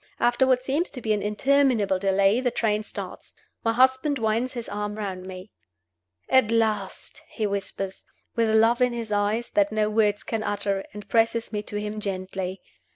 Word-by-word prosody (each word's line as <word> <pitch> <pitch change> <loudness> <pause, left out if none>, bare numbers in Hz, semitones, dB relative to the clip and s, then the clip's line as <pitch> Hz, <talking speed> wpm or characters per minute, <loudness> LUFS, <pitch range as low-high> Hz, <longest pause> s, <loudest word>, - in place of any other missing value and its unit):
After 240 +2 +3
what 255 -1 +3
seems 290 +7 0
to 255 - -8
be 220 -2 0
an 210 - -1
interminable 220 -2 +2
delay 195 +4 +3
the 255 - +2
train 215 -3 0
starts. 215 - -8 0.3
My 225 - +2
husband 260 +4 +3
winds 230 +2 0
his 240 -2 -5
arm 210 0 -3
round 190 -3 -5
me. 185 +2 -9 0.8
"At 260 -5 +4
last!" 215 -4 -1
he 220 - -2
whispers, 195 -1 -3 0.3
with 230 -2 +2
love 225 +2 +4
in 250 -1 +3
his 230 -2 -5
eyes 210 +3 0
that 305 0 +2
no 215 0 +1
words 210 -1 +2
can 225 -1 -2
utter, 200 -2 -1
and 210 -1 -10
presses 230 0 +1
me 210 - -1
to 210 0 -5
him 210 +1 -4
gently. 190 -1 -4
215 Hz, 175 wpm, -25 LUFS, 205-240 Hz, 0.8 s, At